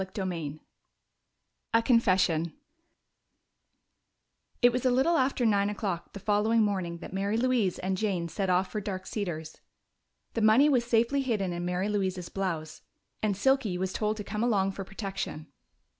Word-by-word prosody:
CHAPTER 190 +1 -4
VIII 160 -5 -4 1.2
A 230 - +5
Confession 185 - +3 2.1
It 245 - +7
was 250 0 -2
a 255 - +4
little 265 +7 +3
after 260 -3 +1
nine 200 -2 +3
o'clock 200 -5 -4
the 200 - -7
following 215 +3 +2
morning 185 -5 -1
that 170 - -9
Mary 200 +3 0
Louise 235 -6 +1
and 190 +1 -1
Jane 185 -4 -1
set 190 +3 -2
off 185 +1 +2
for 210 - -3
Dark 190 -2 -5
Cedars. 165 -7 -5 0.7
The 230 - -1
money 220 +7 +6
was 250 -4 +2
safely 235 +4 +2
hidden 210 -8 -1
in 175 0 -4
Mary 180 +2 -1
Louise's 190 -4 -2
blouse, 165 -5 -3 0.4
and 205 -3 0
Silky 250 -5 +2
was 185 0 -2
told 215 0 -1
to 210 - -5
come 210 +1 -4
along 200 -5 +2
for 195 0 -6
protection. 195 -5 -5
200 Hz, 160 wpm, -29 LUFS, 185-225 Hz, 2.1 s, It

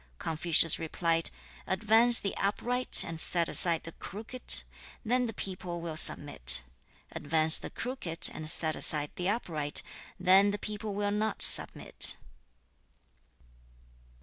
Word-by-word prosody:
Confucius 165 - +2
replied, 165 0 -3 0.4
'Advance 225 +4 +3
the 200 - -6
upright 245 +5 0
and 165 -1 -9
set 170 -2 -2
aside 170 -2 +3
the 165 - -11
crooked, 220 +9 0 0.4
then 250 +2 -2
the - - -6
people 180 -4 -7
will 165 -2 -8
submit. 65 - +4 0.5
Advance 155 +1 +1
the - - -10
crooked 240 -10 -1
and 155 0 -4
set 160 -1 +1
aside 150 -1 +1
the 180 +1 -4
upright, 160 -9 -5 0.4
then 190 +2 +2
the 205 - -5
people 210 0 -8
will 205 0 -4
not 210 +1 -1
submit.' - - +2
180 Hz, 120 wpm, -27 LUFS, 160-210 Hz, 0.5 s, submit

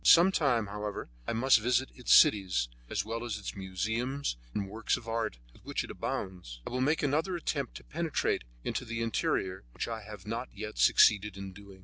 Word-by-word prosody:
Some 175 +3 +8
time, 130 - +2
however, 105 -7 -5 0.2
I - - 0
must 125 +1 +5
visit 125 +4 +1
its 125 - -3
cities, 95 - +6 0.2
as 100 - -1
well 115 +1 -3
as 120 -4 -3
the 100 - -6
museums 110 - -2 0.2
and 100 -2 -2
works 110 +2 0
of 115 - -11
art 115 - -1 0.2
with - - -20
which - - -2
it - - -7
abounds. 90 -11 -4
I - - -5
will 125 +1 -1
make 150 +5 +2
another 160 +6 +1
attempt 145 -6 -2
to - - -9
penetrate 165 0 -1 0.2
into - - -2
the 115 0 -3
interior, 95 - -1
which - - -2
I 115 -1 -4
have 105 -2 -10
not 115 +4 -3
yet 105 +1 -6
succeeded 105 -1 +5
in 95 -1 -7
doing. 100 0 -13
110 Hz, 200 wpm, -31 LUFS, 100-125 Hz, 0.2 s, Some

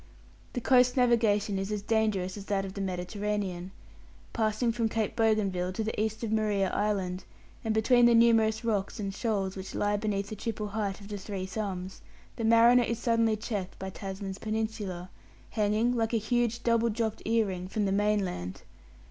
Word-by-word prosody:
The 245 - -2
coast 250 +1 +4
navigation 220 -5 +3
is 195 +2 -3
as 210 -1 -2
dangerous 210 -4 0
as 200 -2 -8
that 195 -2 0
of 190 - -7
the 200 - -5
Mediterranean. 190 0 -3 0.6
Passing 220 +1 +1
from 230 -1 0
Cape 220 -1 -1
Bougainville 200 -5 +1
to 220 - -2
the 215 -1 -2
east 220 +1 -2
of 220 - -2
Maria 210 -3 +1
Island, 195 -3 -1 0.4
and 225 - 0
between 240 +3 +5
the 235 - +5
numerous 225 -1 +4
rocks 205 -3 -1
and 195 -2 -3
shoals 195 -3 -1
which 190 0 -7
lie 205 0 +1
beneath 200 -1 -2
the 215 - -5
triple 215 0 -4
height 205 -1 -3
of 200 - -10
the 205 -1 -4
Three 190 -1 -5
Thumbs, 190 -1 -5 0.3
the 230 - -4
mariner 230 +2 +6
is 235 -1 -1
suddenly 230 -2 +2
checked 210 -4 -4
by 190 0 -5
Tasman's 195 0 -6
Peninsula, 215 -5 -3 0.4
hanging, 215 +3 +1
like 225 0 0
a - - +4
huge 235 +1 0
double 230 0 +3
dropped 220 0 -2
ear 225 0 +3
ring, 185 -2 -4
from 205 +2 -1
the 195 - 0
mainland. 195 - -1
210 Hz, 180 wpm, -29 LUFS, 195-225 Hz, 0.6 s, mariner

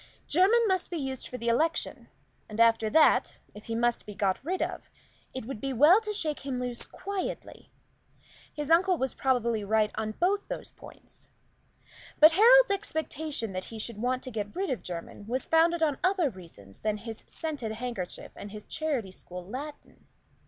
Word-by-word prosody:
Jermyn 420 +8 +4
must 375 -2 0
be 345 - -3
used 265 -3 -4
for 250 - -6
the 235 - -5
election, 310 +8 0 0.4
and 215 +1 -7
after 225 -1 +4
that 315 +6 +4 0.2
if 210 - -12
he 225 - -3
must 240 -1 0
be 210 - -8
got 195 +2 0
rid 365 +5 -2
of, - - -3 0.4
it 260 -4 -6
would 230 -3 -6
be 270 -1 -2
well 305 - +6
to 425 -1 -4
shake 320 -8 -1
him 270 -2 -4
loose 245 -1 -3
quietly; 390 0 -5 0.8
his 295 +1 -4
uncle 360 +2 +5
was 265 -2 -1
probably 235 -5 +1
right 215 +1 +2
on 215 0 -3
both 390 - 0
these - - -6
points. - - -15 0.9
But 310 +2 +9
Harold's 475 +6 +7
expectation 310 - -3
that 185 0 -4
he 225 - -9
should 215 0 -5
want 255 +1 0
to 255 - -6
get 210 +1 -4
rid 380 -2 -1
of 255 - -2
Jermyn 180 +3 -7
was 255 +3 -2
founded 330 +1 +3
on 295 -4 +1
other 365 -6 +2
reasons 165 - -13
than 215 -1 -1
his 225 +1 -7
scented 290 -9 -4
handkerchief 225 -6 -5
and 205 - -8
his 210 0 -9
charity 275 -11 -2
school 180 -1 -9
Latin. 275 +9 -9
255 Hz, 180 wpm, -29 LUFS, 220-325 Hz, 0.9 s, But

